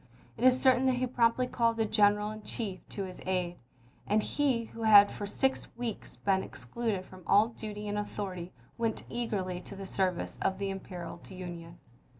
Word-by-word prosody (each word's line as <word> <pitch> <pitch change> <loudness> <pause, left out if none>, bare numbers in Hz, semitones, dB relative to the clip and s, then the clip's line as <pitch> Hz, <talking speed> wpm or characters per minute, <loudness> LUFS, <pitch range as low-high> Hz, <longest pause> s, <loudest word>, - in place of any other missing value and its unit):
It 230 - -6
is 255 0 +6
certain 260 0 +4
that 260 - +3
he 250 +1 0
promptly 240 0 +2
called 230 -2 +1
the 225 - +2
General 210 0 +3
in 215 0 -8
Chief 210 -3 -4
to 200 - -4
his 185 -1 -8
aid, 180 -2 -1 0.5
and 215 +1 +3
he 270 -5 +1
who 230 - -10
had 205 -2 +8
for 205 - -5
six 265 +6 0
weeks 235 -3 -4
been 195 -1 +1
ex - - -8
cluded 220 -6 -2
from 185 0 -13
all 210 +3 +5
duty 210 -2 -6
and 205 0 -1
authority 185 -4 -4 0.3
went 230 -2 -1
eagerly 195 -7 -2
to 200 - -9
the 195 0 -7
service 185 -2 -1
of 190 0 +1
the 200 0 -2
imperiled 180 -3 -7
Union. 175 -2 -8
210 Hz, 185 wpm, -31 LUFS, 190-230 Hz, 0.5 s, had